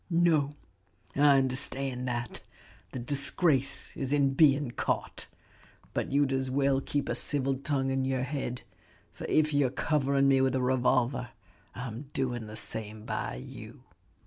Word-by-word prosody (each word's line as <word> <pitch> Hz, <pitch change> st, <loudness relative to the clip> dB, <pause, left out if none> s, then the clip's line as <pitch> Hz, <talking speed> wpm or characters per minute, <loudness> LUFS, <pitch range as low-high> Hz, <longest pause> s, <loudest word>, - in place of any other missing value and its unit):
"No, 165 Hz, -4 st, +3 dB, 0.6 s
I 140 Hz, 0 st, +6 dB
understand 130 Hz, -1 st, -1 dB
that, 120 Hz, -1 st, -3 dB, 0.5 s
the -, -, -5 dB
disgrace 140 Hz, +2 st, +1 dB
is 135 Hz, -1 st, -3 dB
in 140 Hz, -2 st, +3 dB
being 140 Hz, -3 st, +4 dB
caught. -, -, -2 dB, 0.7 s
But -, -, -2 dB
you'd 140 Hz, -1 st, +2 dB
as 130 Hz, 0 st, -1 dB
well 135 Hz, 0 st, +2 dB
keep 145 Hz, +1 st, -2 dB
a -, -, 0 dB
civil 135 Hz, -2 st, 0 dB
tongue 135 Hz, 0 st, -1 dB
in 135 Hz, 0 st, 0 dB
your 130 Hz, -1 st, 0 dB
head; 130 Hz, -2 st, -4 dB, 0.5 s
for -, -, -7 dB
if 155 Hz, -1 st, +2 dB
you're 145 Hz, -2 st, +3 dB
covering 140 Hz, 0 st, +1 dB
me 135 Hz, -1 st, +4 dB
with 130 Hz, -1 st, +2 dB
a 130 Hz, -, +1 dB
revolver, 125 Hz, -1 st, +1 dB, 0.5 s
I'm 125 Hz, +2 st, -6 dB
doing 120 Hz, -4 st, -2 dB
the 105 Hz, -, -8 dB
same 110 Hz, 0 st, -5 dB
by -, -, -3 dB
you." 60 Hz, -, -10 dB
135 Hz, 145 wpm, -29 LUFS, 125-140 Hz, 0.7 s, I